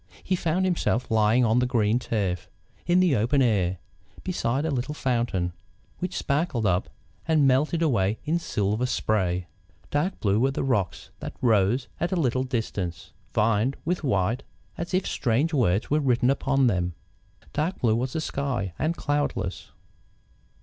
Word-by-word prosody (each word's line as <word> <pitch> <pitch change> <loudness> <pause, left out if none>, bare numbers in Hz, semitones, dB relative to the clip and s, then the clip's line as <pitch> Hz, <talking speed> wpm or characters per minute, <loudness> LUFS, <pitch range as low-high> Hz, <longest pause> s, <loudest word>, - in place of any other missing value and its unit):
He 185 - +1
found 175 +2 0
himself 165 -10 0
lying 110 +3 +4
on 115 +2 +3
the 125 - +2
green 115 -1 +2
turf, 100 -8 -2 0.4
in 175 +1 +4
the 175 -7 +4
open 120 +6 +2
air, 95 -6 +1 0.5
beside 140 -6 -1
a 160 - 0
little 135 +3 -2
fountain, 115 - 0 0.5
which 180 0 -3
sparkled 140 -5 0
up 90 -1 +1 0.4
and 155 -3 +4
melted 150 +6 +2
away 110 -8 +2
in 165 +3 +1
silver 105 -4 -1
spray. 95 -7 0 0.5
Dark 175 +7 0
blue 100 0 +2
were 130 +3 +3
the 135 - -2
rocks 110 -9 -1
that - - -6
rose 115 +1 +2
at 170 - -1
a - - +1
little 130 -3 +1
distance, 110 - -3 0.2
veined 115 +4 +2
with 175 0 -1
white 115 -1 +1 0.3
as 170 +2 -3
if 185 - +1
strange 140 +6 0
words 110 -6 +1
were 150 - +4
written 125 -2 +3
upon 135 -1 +2
them. 90 -6 +1 0.6
Dark 155 +5 -1
blue 110 -3 +3
was 125 +2 -2
the 160 - -1
sky, 125 - -2
and 160 +2 0
cloudless. 145 -10 -2
125 Hz, 155 wpm, -26 LUFS, 105-150 Hz, 0.6 s, lying